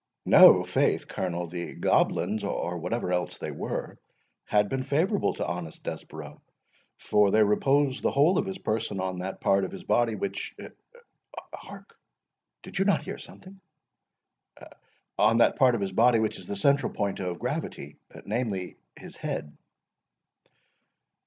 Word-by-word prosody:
"No, -, -, +8 dB
faith, -, -, 0 dB
Colonel; 90 Hz, -1 st, -3 dB
the 85 Hz, +1 st, -6 dB
goblins, 110 Hz, -1 st, +1 dB
or 90 Hz, -3 st, -3 dB
whatever 100 Hz, +2 st, -2 dB
else 90 Hz, 0 st, -2 dB
they -, -, -5 dB
were, -, -, -5 dB, 0.5 s
had 105 Hz, 0 st, +2 dB
been 135 Hz, +4 st, -2 dB
favourable 160 Hz, +10 st, 0 dB
to -, -, -3 dB
honest 85 Hz, -2 st, -6 dB
Desborough, 75 Hz, -1 st, -8 dB, 0.6 s
for 105 Hz, -1 st, +2 dB
they 110 Hz, +2 st, +4 dB
reposed 135 Hz, +6 st, +2 dB
the -, -, +2 dB
whole 150 Hz, +7 st, +3 dB
of 195 Hz, -, -2 dB
his 190 Hz, 0 st, -4 dB
person 110 Hz, -, -2 dB
on 95 Hz, -1 st, -3 dB
that 95 Hz, +1 st, -5 dB
part 100 Hz, 0 st, +2 dB
of 95 Hz, -, -2 dB
his -, -, -9 dB
body 120 Hz, -2 st, +1 dB
which—Hark, 480 Hz, -, -9 dB, 0.7 s
did 195 Hz, -, -6 dB
you 195 Hz, -, +2 dB
not 200 Hz, -, +2 dB
hear -, -, -6 dB
something?—is 190 Hz, 0 st, -16 dB, 2.6 s
the 100 Hz, -, -2 dB
central 140 Hz, +8 st, +2 dB
point 100 Hz, -1 st, -2 dB
of 90 Hz, -2 st, -3 dB
gravity, 75 Hz, -3 st, -5 dB, 0.3 s
namely, 105 Hz, -5 st, -3 dB, 0.2 s
his -, -, -12 dB
head." 75 Hz, -, -5 dB
105 Hz, 125 wpm, -27 LUFS, 90-140 Hz, 2.6 s, No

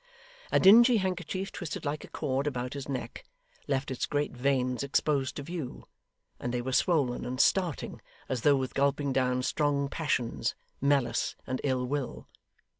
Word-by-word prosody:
A -, -, +4 dB
dingy 235 Hz, +5 st, +8 dB
handkerchief 185 Hz, 0 st, -2 dB
twisted 160 Hz, -2 st, -5 dB
like 145 Hz, +1 st, -2 dB
a -, -, -9 dB
cord 135 Hz, +2 st, -2 dB
about 125 Hz, -2 st, -3 dB
his 140 Hz, -1 st, -6 dB
neck, 130 Hz, -2 st, -5 dB, 0.4 s
left 135 Hz, -1 st, -1 dB
its 130 Hz, -, -2 dB
great 145 Hz, 0 st, 0 dB
veins 125 Hz, -1 st, 0 dB
exposed 140 Hz, -1 st, 0 dB
to 145 Hz, -, -5 dB
view, 160 Hz, -4 st, -6 dB, 0.6 s
and 120 Hz, -, -3 dB
they 125 Hz, -, -1 dB
were 130 Hz, +2 st, -3 dB
swollen 140 Hz, -7 st, +2 dB
and 125 Hz, +1 st, -4 dB
starting, 180 Hz, -7 st, +1 dB, 0.3 s
as 130 Hz, -3 st, -2 dB
though 145 Hz, +2 st, +5 dB
with 130 Hz, -1 st, -2 dB
gulping 140 Hz, 0 st, +1 dB
down 125 Hz, -1 st, +1 dB
strong 140 Hz, 0 st, +1 dB
passions, 140 Hz, -6 st, -1 dB, 0.3 s
malice, 140 Hz, -3 st, +1 dB
and 130 Hz, -1 st, -3 dB
ill 130 Hz, -2 st, 0 dB
will. 140 Hz, 0 st, -3 dB
140 Hz, 160 wpm, -29 LUFS, 130-150 Hz, 0.6 s, dingy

